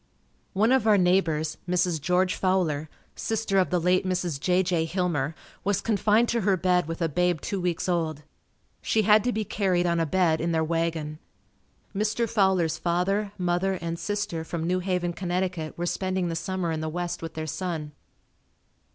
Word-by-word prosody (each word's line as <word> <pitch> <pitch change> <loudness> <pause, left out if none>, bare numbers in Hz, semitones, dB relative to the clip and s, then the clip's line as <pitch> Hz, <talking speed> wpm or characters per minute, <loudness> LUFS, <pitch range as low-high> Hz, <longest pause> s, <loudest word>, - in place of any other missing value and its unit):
One 215 +5 +3
of 260 -4 +3
our 210 -1 +6
neighbors, 175 -4 +2
Mrs. 180 -3 +1
George 180 +3 +2
Fowler, 165 -6 0 0.3
sister 220 -3 0
of 185 - +2
the 180 - +1
late 180 +3 +2
Mrs. 180 -5 -1
J. 180 +5 +2
J. 175 -3 +1
Hillmer, 165 -4 -1 0.3
was 200 0 +1
confined 215 +2 +2
to 235 0 +1
her 195 -1 +2
bed 180 -2 +2
with 165 +1 -3
a - - +2
babe 175 +2 +1
two 195 +4 -3
weeks 175 -1 -1
old. 160 -4 -1 0.6
She 220 - +1
had 210 +1 +5
to 245 - +2
be 220 -2 -2
carried 185 -3 +1
on 170 -1 +1
a 165 - +1
bed 165 -2 +2
in 170 +1 0
their 160 0 +2
wagon. 160 -2 -2 0.8
Mr. 220 +3 0
Fowler's 190 -7 +2
father, 185 +5 0
mother 180 +1 0
and 170 -1 -4
sister 205 -5 -2
from 165 0 -4
New 180 +2 +1
Haven, 180 -2 -1
Conn., 180 -2 -2
were 175 - -2
spending 185 0 -1
the 165 - -2
summer 185 -1 -2
in 160 -1 -2
the 160 - -2
west 175 +1 -3
with 165 -1 -7
their 155 0 -3
son. 160 -1 -4
180 Hz, 180 wpm, -26 LUFS, 165-190 Hz, 0.8 s, our